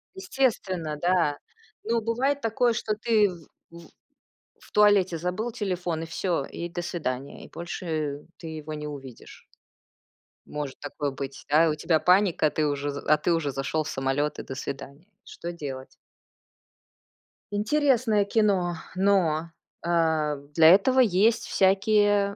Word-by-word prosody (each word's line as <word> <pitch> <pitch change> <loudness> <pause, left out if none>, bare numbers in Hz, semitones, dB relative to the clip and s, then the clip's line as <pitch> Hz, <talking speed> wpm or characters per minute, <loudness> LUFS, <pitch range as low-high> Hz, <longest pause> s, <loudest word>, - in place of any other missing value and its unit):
Естественно, 195 - -1
да. 175 -4 +2 0.5
Ну, 230 +1 0
бывает 265 +6 0
такое, 230 +1 +1
что 220 -2 -2
ты 215 -2 +3
в 170 -3 -11 0.3
в 170 - -13 0.7
в - - -19
туалете 200 -5 +4
забыл 185 +8 -3
телефон 180 -6 -3
и - - -5
всё, 165 -3 -1
и 170 +4 -6
до 175 0 -5
свидания. 140 -6 -4
И - - -13
больше 155 -4 -4 0.2
ты 165 - -8
его 155 -1 -6
не 150 0 -5
увидишь. 135 -4 -11 1.0
Может 145 -3 -6
такое 145 -1 -4
быть, 135 0 -7
да? 155 +3 +5
И - - +2
у 150 - 0
тебя 160 +1 +1
паника, 180 -4 +3
ты 155 0 -1
уже 145 0 -2
з 140 - -6
а 150 0 +4
ты 175 - +1
уже 150 -4 0
зашел 135 +4 -2
в - - -6
самолет 135 +3 -1
и - - -5
до 130 - -7
свидания. 140 +4 -7 0.2
Что 170 - -7
делать? 135 -5 -8 1.5
Интересное 225 -1 +2
кино, 195 -5 +1 0.2
но, 175 -5 +2 0.3
а, 160 -3 +1 0.2
для 160 -1 +7
этого 255 +8 +5
есть 225 +1 +3
всякие 200 +1 +3
175 Hz, 145 wpm, -26 LUFS, 150-205 Hz, 1.5 s, для